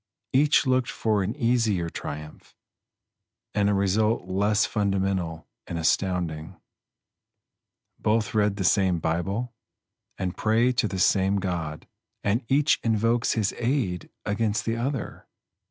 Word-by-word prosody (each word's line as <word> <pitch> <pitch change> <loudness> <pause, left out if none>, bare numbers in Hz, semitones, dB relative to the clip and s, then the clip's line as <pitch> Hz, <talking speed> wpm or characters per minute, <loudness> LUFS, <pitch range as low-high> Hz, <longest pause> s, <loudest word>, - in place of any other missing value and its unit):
Each 145 +3 +4
looked 130 -1 +2
for 110 -2 0
an 95 +4 -2
easier 115 - +1
triumph, 75 -1 -8 1.0
and 100 -1 +2
a 100 - +2
result 105 +4 +1
less 105 +3 +2
fundamental 95 -5 -1 0.2
and 85 - -4
astounding. 85 -2 -1 1.4
Both 110 0 +1
read 105 -2 +2
the 100 - -3
same 95 -1 +3
Bible, 95 +9 -2 0.6
and 90 -1 -3
pray 115 +3 +2
to 120 -3 +1
the 95 - -4
same 95 +1 +3
God; 85 -6 -3 0.4
and 105 +5 +1
each 145 +3 +3
invokes 115 +1 +2
his 105 -4 0
aid 115 -8 -1 0.2
against 105 0 0
the 115 - 0
other. 125 0 -4
105 Hz, 120 wpm, -26 LUFS, 95-115 Hz, 1.4 s, Each